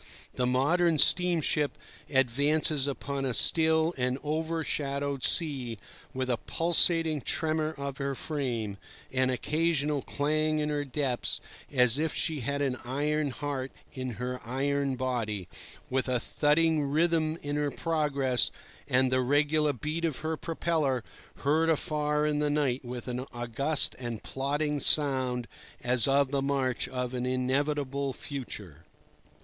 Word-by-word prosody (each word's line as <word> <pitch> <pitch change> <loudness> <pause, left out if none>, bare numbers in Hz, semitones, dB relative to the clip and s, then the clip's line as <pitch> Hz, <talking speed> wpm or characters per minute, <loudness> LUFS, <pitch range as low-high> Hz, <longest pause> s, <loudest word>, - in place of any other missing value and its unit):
The 125 - 0
modern 160 +6 +2
steamship 160 -3 +3 0.3
advances 140 +3 +2
upon 140 0 -3
a 130 -3 0
still 160 0 +4
and 125 +1 0
overshadowed 145 -3 -2
sea 135 -9 +2 0.3
with 130 -1 -3
a 125 -2 0
pulsating 165 -1 +3
tremor 155 +1 -1
of 140 0 -5
her 140 0 -2
frame, 120 -10 -3 0.3
an 130 0 +2
occasional 150 +2 0
clang 155 +3 0
in 150 0 -1
her 145 -1 -1
depths, 135 -3 -1 0.3
as 125 -1 +4
if 160 0 0
she 160 -3 0
had 140 +3 -2
an 130 -2 -1
iron 145 +4 -1
heart 135 0 -4 0.2
in 130 -2 -4
her 125 +2 -4
iron 135 +2 -1
body; 115 -7 -2 0.4
with 130 +1 -1
a 125 -1 +1
thudding 155 +5 +2
rhythm 155 +2 +1
in 145 0 -2
her 145 -1 0
progress 140 -6 +1 0.4
and 130 0 +2
the 130 0 +3
regular 145 +3 +2
beat 150 +6 -4
of 160 -5 0
her 160 0 0
propeller, 155 -6 -1 0.4
heard 155 +3 +2
afar 150 -1 0
in 150 -1 0
the 150 0 +1
night 140 -4 0
with 125 0 -7
an 125 0 -3
august 120 +6 +2
and 120 -3 -5
plodding 145 +2 -1
sound 130 -5 +3 0.4
as 125 0 +2
of 140 0 +3
the 140 -1 0
march 135 -3 0
of 125 -1 -3
an 125 0 -2
inevitable 140 +1 -1
future. 100 - -7
140 Hz, 135 wpm, -29 LUFS, 130-150 Hz, 0.4 s, still